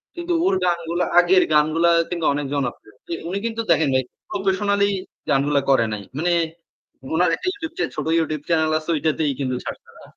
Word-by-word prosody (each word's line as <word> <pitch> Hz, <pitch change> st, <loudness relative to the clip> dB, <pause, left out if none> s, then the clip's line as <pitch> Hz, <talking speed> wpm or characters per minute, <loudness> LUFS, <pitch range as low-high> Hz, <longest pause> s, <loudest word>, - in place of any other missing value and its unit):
কিন্তু 345 Hz, 0 st, -2 dB
ওর -, -, +3 dB
গানগুলা, 170 Hz, 0 st, 0 dB
আগের 180 Hz, +1 st, +5 dB
গানগুলা 155 Hz, +3 st, +3 dB, 0.2 s
কিন্তু 170 Hz, -2 st, -2 dB
অনেক 145 Hz, 0 st, -2 dB
জনপ্রিয়। 125 Hz, -6 st, -4 dB
কি -, -, -4 dB, 0.2 s
উনি 190 Hz, -, -2 dB
কিন্তু 230 Hz, 0 st, -2 dB
দেখেন 160 Hz, -3 st, +3 dB
ভাই 130 Hz, -, +2 dB, 0.3 s
professionally 200 Hz, +1 st, +1 dB, 0.4 s
গানগুলা 140 Hz, 0 st, +2 dB
করে 130 Hz, -4 st, +4 dB
নাই। 105 Hz, -2 st, -5 dB
মানে 175 Hz, +3 st, +1 dB, 0.8 s
ওনার 175 Hz, +2 st, +3 dB
একটা -, -, -7 dB
YouTube 330 Hz, -5 st, -7 dB
চে -, -, +2 dB
ছোট -, -, -3 dB
YouTube 155 Hz, -2 st, -2 dB
চ্যানেল 160 Hz, -2 st, +2 dB
আছে। 155 Hz, -, -11 dB
ঐটাতেই 155 Hz, -1 st, 0 dB
কিন্তু 130 Hz, -2 st, -1 dB
ছাড়ছে -, -, -7 dB
না। -, -, -15 dB
165 Hz, 175 wpm, -22 LUFS, 145-185 Hz, 0.8 s, আগের